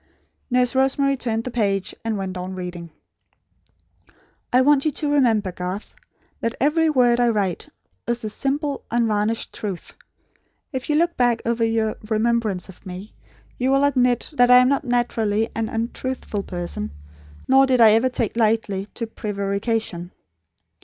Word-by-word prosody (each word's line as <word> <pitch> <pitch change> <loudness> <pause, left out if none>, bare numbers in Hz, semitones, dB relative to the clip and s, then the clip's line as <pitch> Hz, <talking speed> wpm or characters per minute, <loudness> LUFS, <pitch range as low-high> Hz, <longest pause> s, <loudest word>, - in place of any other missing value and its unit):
Nurse 250 -1 +2
Rosemary 270 +1 +2
turned 230 -3 -2
the 255 - -5
page, 200 -5 0
and 225 -2 -1
went 190 -1 -4
on 185 +1 -5
reading. 175 -2 -6 1.6
"I 250 - +5
want 280 +1 +4
you 310 - +2
to 295 0 -2
remember, 225 -9 +2
Garth, 180 +3 -5 0.5
that 230 +1 -2
every 315 +3 +3
word 245 -4 +3
I 240 -1 +4
write, 200 -6 -1 0.4
is 235 0 -1
the 215 - -2
simple 280 +3 -2
unvarnished 225 -1 0
truth. 195 -5 -6 0.8
If 260 +2 -4
you 300 - +2
look 340 +2 +2
back 245 -2 +2
over 230 0 0
your 225 -1 0
remembrance 220 -4 0
of 190 - -15
me, 185 +3 -9 0.5
you 255 +1 +1
will 275 +1 +3
admit 250 -3 +2
that 245 -4 +4
I 250 - +9
am 250 0 +5
not 280 0 0
naturally 225 -3 0
an 225 -1 -2
untruthful 230 -1 -3
person, 175 - -4 0.6
nor 270 +1 +5
did 255 -1 +2
I 225 -2 +8
ever 225 +4 +3
take 235 -4 -2
easily 215 -3 0
to 230 - -2
prevarication. 200 -3 -3
230 Hz, 155 wpm, -22 LUFS, 205-255 Hz, 1.6 s, I